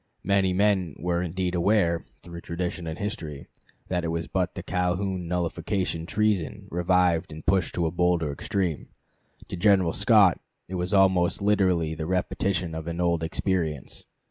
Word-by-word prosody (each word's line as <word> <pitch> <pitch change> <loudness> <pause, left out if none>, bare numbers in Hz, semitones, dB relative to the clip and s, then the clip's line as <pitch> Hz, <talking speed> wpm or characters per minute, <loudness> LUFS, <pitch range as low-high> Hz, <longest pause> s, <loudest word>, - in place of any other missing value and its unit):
Many 100 -1 +2
men 95 -4 +1
were 85 0 -1
indeed 90 +1 -2
aware, 85 -2 +2 0.2
through 85 -1 -9
tradition 85 0 -4
and 80 0 -4
history, 80 -9 -5 0.4
that 90 -2 -1
it - - -1
was 85 0 -2
but 90 -2 -1
the - - -6
Calhoun 90 0 -1
nullification 85 0 -2
treason 105 -5 0
revived 90 -1 +2
and 80 +1 -9
pushed 95 -3 +1
to 85 - +1
a 80 - 0
bolder 85 -3 +1
extreme. 90 +1 -2 0.6
To - - -4
General 95 -2 +3
Scott 105 -7 +5 0.3
it 95 - -8
was 90 0 -2
almost 95 -2 +3
literally 95 -6 +2
the 80 0 -4
repetition 90 -1 -1
of 80 0 -6
an 85 0 -4
old 85 -2 +1
experience. 80 -4 -2
90 Hz, 155 wpm, -26 LUFS, 85-95 Hz, 0.6 s, Scott